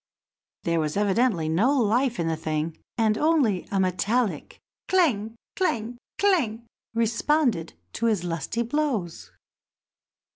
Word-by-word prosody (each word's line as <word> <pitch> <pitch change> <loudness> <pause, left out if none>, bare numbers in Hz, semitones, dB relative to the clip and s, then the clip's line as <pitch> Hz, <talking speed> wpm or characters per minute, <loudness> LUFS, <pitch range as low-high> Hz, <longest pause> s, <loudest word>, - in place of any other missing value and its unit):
There 170 -1 +1
was 155 +2 -1
evidently 205 -4 +2
no 220 - +2
life 240 +1 +2
in 165 - 0
the 165 - 0
thing, 155 0 -2 0.2
and 220 -2 +2
only 285 - +2
a 195 - 0
metallic 200 +5 0 0.3
clang! 230 - +2 0.2
clang! 240 - -1 1.0
responded 230 - +1 0.2
to 230 - 0
his 210 -6 +1
lusty 175 +7 -2
blows. 235 - -2
220 Hz, 110 wpm, -25 LUFS, 175-250 Hz, 1.0 s, evidently